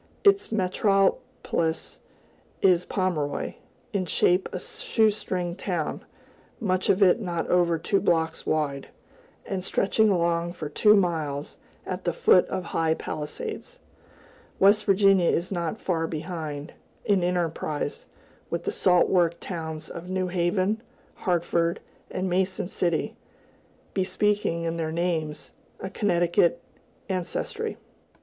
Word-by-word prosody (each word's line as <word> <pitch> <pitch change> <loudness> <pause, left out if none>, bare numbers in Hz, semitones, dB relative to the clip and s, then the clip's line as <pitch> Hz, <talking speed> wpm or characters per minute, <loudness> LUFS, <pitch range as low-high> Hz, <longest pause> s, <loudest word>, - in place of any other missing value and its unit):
Its 400 - +4
metropolis 195 - 0 0.6
is 180 -2 +4
Pomeroy, 165 -7 -1 0.4
in 190 -3 -1
shape 180 +3 +2
a - - -4
"shoe 225 - +1
string" 180 -4 -3
town, 175 -5 -3 0.6
much 185 -5 0
of 195 +1 +5
it 195 +5 +4
not 175 -4 -2
over 175 -2 +3
two 195 +5 +1
blocks 160 -3 +1
wide, 145 -3 -1 0.6
and 190 -2 -3
stretching 210 +3 +2
along 170 -2 +1
for 155 -4 -6
two 210 +8 +5
miles, 160 -7 -1 0.3
at 185 0 -4
the 175 - 0
foot 180 - +5
of 185 - -3
high 165 -1 0
palisades. 435 - -5 0.8
West 205 +2 +5
Virginia 195 -2 +4
is 175 +3 0
not 175 +3 -2
far 165 -3 -1
behind, 155 -2 -5 0.3
in 200 -4 +3
enterprise, 165 -4 -2 0.4
with - - -2
the - - -1
salt 180 -2 +4
work 170 -2 +2
towns 160 -3 -5
of 170 +2 -8
New 185 -1 -1
Haven, 185 +4 0 0.3
Hartford, 170 -1 0 0.3
and 185 - -2
Mason 185 0 0
City, 170 -3 -1 0.8
bespeaking, 195 -2 0
in 165 0 -2
their 160 -1 -2
names, 160 -3 -2 0.3
a 190 - -6
Connecticut 175 -4 +2 0.5
ancestry. 185 -3 -3
180 Hz, 120 wpm, -26 LUFS, 165-195 Hz, 0.8 s, of